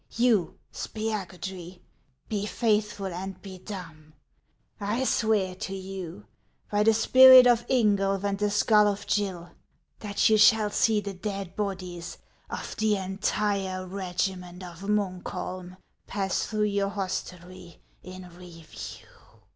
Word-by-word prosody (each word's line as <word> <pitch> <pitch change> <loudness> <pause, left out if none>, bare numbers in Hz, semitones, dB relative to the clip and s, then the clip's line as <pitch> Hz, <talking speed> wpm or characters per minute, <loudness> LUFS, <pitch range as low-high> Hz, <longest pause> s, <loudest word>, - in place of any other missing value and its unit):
You, 225 -8 +2 0.2
Spiagudry, 190 -4 -5 0.5
be 210 -1 -2
faithful 210 -3 0
and 185 +1 -6
be 190 -2 -9
dumb. 165 -6 -9 0.7
I 215 +5 -1
swear 215 -7 +1
to 195 +1 -6
you, 190 0 -7 0.5
by 205 0 +2
the 220 +1 +5
spirit 255 +3 +9
of 240 -1 +3
Ingulf 200 -5 +2
and 200 -1 0
the 210 0 +1
skull 210 0 +4
of 205 0 -2
Gill, 185 -4 -2 0.5
that 205 -2 +1
you 220 -1 +4
shall 215 0 +5
see 215 0 +2
the 200 0 -5
dead 195 -1 -5
bodies 185 -4 -5 0.3
of - - -6
the 215 -1 +2
entire 195 0 -2
regiment 180 -1 -4
of 175 -1 -10
Muukholm 185 -2 -3 0.3
pass 195 -2 -1
through 210 -1 0
vour 200 -1 +1
hostelrv 185 -2 -6 0.2
in 185 0 -10
review." 175 -2 -10
195 Hz, 125 wpm, -27 LUFS, 185-210 Hz, 0.7 s, spirit